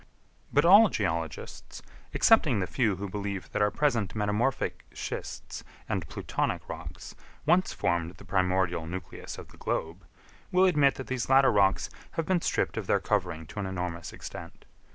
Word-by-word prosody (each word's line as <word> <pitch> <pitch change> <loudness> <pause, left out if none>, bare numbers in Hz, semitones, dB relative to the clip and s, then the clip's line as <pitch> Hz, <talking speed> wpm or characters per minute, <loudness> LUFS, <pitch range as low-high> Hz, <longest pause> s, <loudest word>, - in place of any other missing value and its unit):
But 145 +3 +4
all 205 +5 +8
geologists, 80 -6 -4 0.3
excepting 155 - +4
the 95 - 0
few 110 -1 +1
who 100 +2 -5
believe 100 -1 -4
that - - -1
our 105 - +4
present 120 -8 0
metamorphic 105 +5 0
schists - - -6 0.2
and - - -2
plutonic - - -2
rocks 80 +2 -8 0.3
once 185 +1 +3
formed 85 0 -1
the 100 - -14
primordial 90 -3 +1
nucleus 90 0 -7
of - - -10
the - - -17
globe, 85 +4 -3 0.4
will 185 +1 +5
admit 150 -7 +4
that 135 - -6
these 130 -2 -3
latter 135 0 +6
rocks 100 -1 +3 0.3
have 165 - -1
been 180 0 +1
stripped - - 0
of - - -3
their - - +3
covering 80 +1 -1
to 105 - -8
an 100 - -2
enormous 90 -2 -4
extent. - - -9
100 Hz, 160 wpm, -28 LUFS, 90-135 Hz, 0.4 s, all